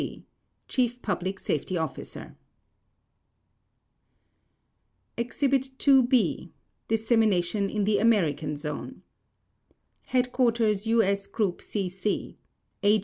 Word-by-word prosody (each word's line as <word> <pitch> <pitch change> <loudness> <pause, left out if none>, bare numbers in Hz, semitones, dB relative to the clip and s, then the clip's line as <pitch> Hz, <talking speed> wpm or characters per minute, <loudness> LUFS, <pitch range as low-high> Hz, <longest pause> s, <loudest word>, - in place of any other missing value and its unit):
C. - - -7 0.4
Chief 245 -1 0
Public 190 -1 -2
Safety 180 +1 -2
Officer 160 -1 -5 2.8
Exhibit 265 +3 0 0.2
II 270 -1 +8
B. 250 -3 +1 0.4
Dissemination 215 -4 +2
in 210 0 -1
the 205 +1 +2
American 160 -10 +2
Zone 150 0 -6 1.1
HQ. 250 0 0 0.5
U.S. 200 -3 +2
GROUP 200 -3 -1
C.C. 190 0 -3 0.5
A. 210 +1 +5
210 Hz, 85 wpm, -27 LUFS, 185-235 Hz, 2.8 s, II